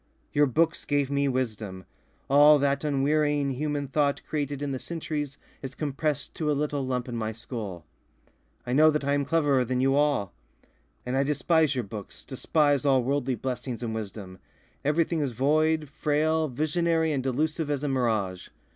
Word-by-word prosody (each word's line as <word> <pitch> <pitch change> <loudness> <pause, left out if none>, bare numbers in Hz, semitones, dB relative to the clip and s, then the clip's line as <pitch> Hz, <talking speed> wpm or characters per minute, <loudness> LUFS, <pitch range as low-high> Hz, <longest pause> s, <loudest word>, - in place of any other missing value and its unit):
"Your 145 0 +4
books 160 +6 +1
gave 145 -1 0
me 140 0 +1
wisdom. 110 -8 -3 0.4
All 145 +2 +7
that 140 0 0
unwearying 145 0 +1
human 145 +1 -2
thought 140 0 0
created 145 -2 -2
in 145 - -2
the 130 - -3
centuries 150 -3 -4 0.2
is 135 -1 -7
compressed 150 0 -2
to 155 -2 -2
a 145 - +1
little 145 -1 -1
lump 125 -1 -2
in 120 - -5
my 110 -1 -2
skull. 110 -7 -7 0.8
I 125 - -2
know 155 +3 +6
that 150 -1 0
I 140 - +1
am 145 -1 +1
cleverer 145 -5 +2
than 125 +1 -1
you 135 +1 +3
all. 145 -10 +1 0.7
"And 125 +1 -2
I 135 - +3
despise 150 +1 +2
your 125 - -1
books, 105 -1 -9
despise 145 +1 +1
all 135 -3 +3
worldly 135 0 0
blessings 125 0 -4
and 115 -1 -3
wisdom. 100 -4 -7 0.4
Everything 160 +2 +1
is 135 -4 -1
void, 155 +5 +2
frail, 155 +2 +1
visionary 160 +4 0
and 140 -3 0
delusive 150 +4 -1
as 145 -1 -1
a - - 0
mirage. 110 -9 -1
140 Hz, 170 wpm, -27 LUFS, 125-150 Hz, 0.8 s, All